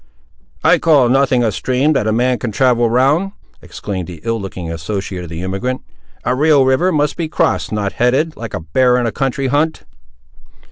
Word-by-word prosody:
"I - - +4
call 145 -7 +4
nothing 130 -1 +2
a 110 - +1
stream 130 +7 0
that 110 -6 0
a - - +2
man 125 +2 +1
can 120 - -3
travel 120 0 +2
round," 145 - +2 0.3
exclaimed 95 -4 -6
the 85 -3 -9
ill 115 -1 -2
looking 90 -3 -6
associate 90 +2 -4
of 85 - -9
the 85 +1 -6
emigrant: 110 +8 -3 0.4
"a 125 - 0
real 145 0 +4
river 130 +8 +2
must 150 -2 0
be 165 -2 -3
crossed; - - 0
not 105 -2 -2
headed, 135 +7 +1
like 115 -3 -6
a - - -4
bear 125 +10 +2
in 125 - 0
a 115 - -1
county 135 +1 -2
hunt." 145 +4 0
125 Hz, 190 wpm, -17 LUFS, 105-140 Hz, 0.4 s, I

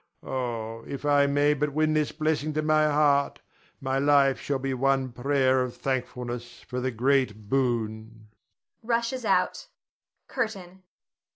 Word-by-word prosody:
Oh, 115 -3 -4
if 140 +1 -6
I 145 -1 +4
may 145 +1 +3
but 145 0 -2
win 155 +1 +2
this 155 -1 +1
blessing 155 0 -1
to 155 - 0
my 155 0 +3
heart, 145 -1 +2 0.4
my 135 0 -1
life 140 -1 +4
shall 140 - -1
be 135 0 -3
one 135 0 +1
prayer 130 +1 +2
of 125 -1 -4
thankfulness 125 -2 -4
for 125 0 -5
the 130 - 0
great 125 -3 0
boon 110 -4 -2 0.5
[rushes 235 +1 -1
out]. - - +1 0.6
CURTAIN. 195 -7 -4
135 Hz, 135 wpm, -26 LUFS, 125-150 Hz, 0.6 s, I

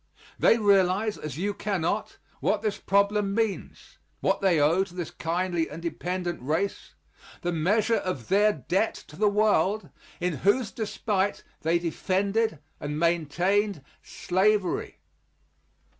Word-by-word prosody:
They 230 - +5
realize, 200 0 +3
as 150 -3 -6
you 200 +4 -1
cannot, 195 -6 -2 0.2
what - - 0
this 215 -2 -1
problem 200 0 +2
means 225 -3 -3 0.2
what - - +1
they 185 -5 +3
owe 160 +6 +4
to 180 -2 -12
this 175 -3 -4
kindly 170 0 -1
and 150 - -7
dependent 175 0 -3
race 160 +9 -2 0.5
the 175 - 0
measure 210 +8 +2
of 140 -11 -4
their 205 +2 +4
debt 195 - -1
to 150 - -12
the 210 +4 +3
world 210 -1 +2 0.3
in 175 -3 -1
whose 205 - +2
despite 205 -2 -1 0.2
they 165 +2 +2
defended 190 +4 0 0.2
and 150 0 -4
maintained 175 +2 +1 0.2
slavery. 195 +1 0
190 Hz, 130 wpm, -27 LUFS, 170-205 Hz, 0.5 s, They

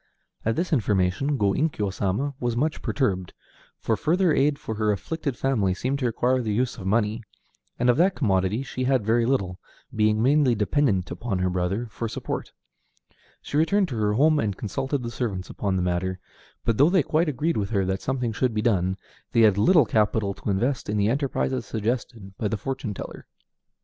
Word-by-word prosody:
At 115 0 0
this 170 +3 -1
information 105 +3 +1
Go 100 -4 +2
Inkyo 105 - -1
Sama 105 +10 -1
was 120 -1 -1
much 155 +5 0
perturbed, 95 -10 -1 0.4
for - - 0
further 175 +1 +2
aid 140 +1 +2
for 110 - -5
her 105 0 +1
afflicted 140 - -3
family 105 -9 +1
seemed 130 +7 -2
to 125 - +1
require 125 +2 +1
the 110 -3 -2
use 120 +3 -1
of 95 - -5
money, 110 +2 +1 0.6
and 125 - +1
of 125 - +4
that 185 +4 +3
commodity 100 0 +1
she 130 -1 -4
had 130 -5 +2
very 115 +1 +2
little, 95 -9 0 0.4
being 110 0 +2
mainly 135 +1 +3
dependent 105 -3 +1
upon 115 -5 -3
her 90 0 0
brother 90 +6 -1
for 115 +2 -4
support. - - -5 0.9
She 145 - -3
returned 185 +5 +2
to 125 - -4
her 105 -1 +1
home 150 +6 +4
and 100 -3 -1
consulted 135 +6 -2
the 115 - -4
servants 100 -7 -3
upon 100 -2 -2
the 90 - 0
matter; 90 +1 -1 0.5
but 115 -2 +1
though 145 +4 +6
they 185 -4 +3
quite 160 +4 +1
agreed 150 +5 -1
with 100 -2 -1
her 100 -4 +1
that 95 +1 -2
something 125 -3 -1
should 115 +1 -1
be 105 - 0
done, 95 -4 +1 0.4
they 115 - +4
had 105 -3 +6
little 160 - +5
capital 105 -2 +1
to 105 - -6
invest 120 +7 0
in 105 - 0
the 100 +1 +2
enterprises 130 -1 -1
suggested 110 -3 -3
by 110 - 0
the 110 +2 -2
fortune 125 -2 -4
teller. - - -8
115 Hz, 195 wpm, -25 LUFS, 100-135 Hz, 0.9 s, though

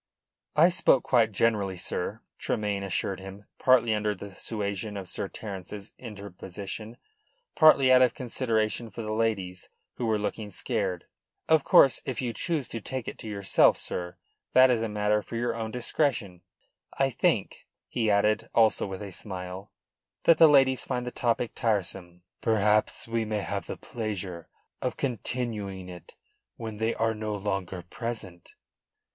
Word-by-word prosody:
"I 165 +4 +7
spoke 155 -7 +4
quite 115 -4 +3
generally, 100 -3 +1
sir," - - -3 0.2
Tremayne 105 -2 -1
assured 95 0 -2
him, 95 +2 -10
partly 125 -4 +4
under 105 -1 0
the 100 +1 -9
suasion 100 0 -4
of 95 -2 -6
Sir 100 - -3
Terence's 100 0 -8
interposition, 100 0 -7 0.6
partly 140 -5 +7
out 130 0 +7
of 125 - +4
consideration 115 -3 0
for 110 +3 -7
the 110 0 -3
ladies, 100 -5 -1 0.3
who 120 - -1
were 110 -1 +2
looking 105 0 -3
scared. 95 -4 -2 0.4
"Of 160 -3 +4
course, 135 - +6
if 130 -3 -4
you 120 -3 -2
choose 160 -4 -1
to 115 - -5
take 130 +2 -5
it - - -6
to - - -8
yourself, 100 -2 +3
sir, 90 -1 -4 0.4
that 130 0 +7
is 115 -2 +1
a 115 - -1
matter 105 0 +1
for 115 - -8
your 120 +1 0
own 115 -1 -4
discretion. 120 - -1 0.6
I 135 0 +2
think," - - 0 0.2
he 115 -3 0
added, 105 +1 +2
also 110 -2 +4
with 95 +1 -6
a 100 - -7
smile, 95 0 -7 0.5
"that 165 -2 +5
the 165 - +10
ladies 135 -3 +5
find 125 -2 -2
the 125 - -4
topic 120 -1 0
tiresome." 90 -5 -2 0.2
"Perhaps 105 0 +2
we 115 0 0
may 105 -1 -2
have 100 0 -4
the - - -5
pleasure 100 -7 -5 0.3
of 125 - -2
continuing 110 -6 -3
it 90 -2 -12 0.4
when 110 -2 -6
they 110 +2 0
are 115 0 +1
no 110 -1 -3
longer 95 -3 -3
present." 95 -3 -7
110 Hz, 155 wpm, -28 LUFS, 100-120 Hz, 0.6 s, the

